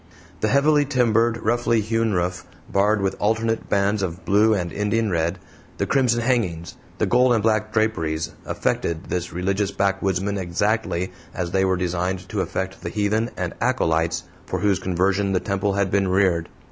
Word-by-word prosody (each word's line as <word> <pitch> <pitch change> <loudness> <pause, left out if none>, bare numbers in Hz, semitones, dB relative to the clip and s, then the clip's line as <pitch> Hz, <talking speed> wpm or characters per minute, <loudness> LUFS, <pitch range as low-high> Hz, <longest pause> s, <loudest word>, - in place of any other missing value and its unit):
The 110 - +1
heavily 145 +5 +4
timbered, 115 -4 +2
roughly 115 0 +2
hewn 115 +1 0
roof, 90 -1 -1 0.2
barred 100 +2 +2
with 95 - 0
alternate 115 +1 0
bands 100 +1 +1
of 90 -1 -4
blue 105 +3 +4
and 90 -3 -3
Indian 105 +1 0
red, 85 +1 0 0.4
the - - 0
crimson 125 -4 +2
hangings, 100 -10 -1 0.2
the - - +1
gold 125 +1 +4
and 110 -3 +1
black 110 -1 +1
draperies, 80 -8 0
affected 85 +1 -2
this 90 -1 -2
religious 95 +3 -1
backwoodsman 95 0 0
exactly 95 0 -1 0.2
as 85 -2 -3
they 95 +1 +2
were 95 -1 +1
designed 90 +1 -2
to 105 - -1
affect 95 0 -4
the - - -4
heathen 110 +2 0
and - - -3
acolytes 80 0 +1 0.2
for - - -3
whose 100 -4 +2
conversion 95 +3 0
the 90 - +2
temple 100 +1 -1
had 100 -1 0
been 100 -1 +2
reared. 90 -3 +2
100 Hz, 165 wpm, -23 LUFS, 90-110 Hz, 0.4 s, heavily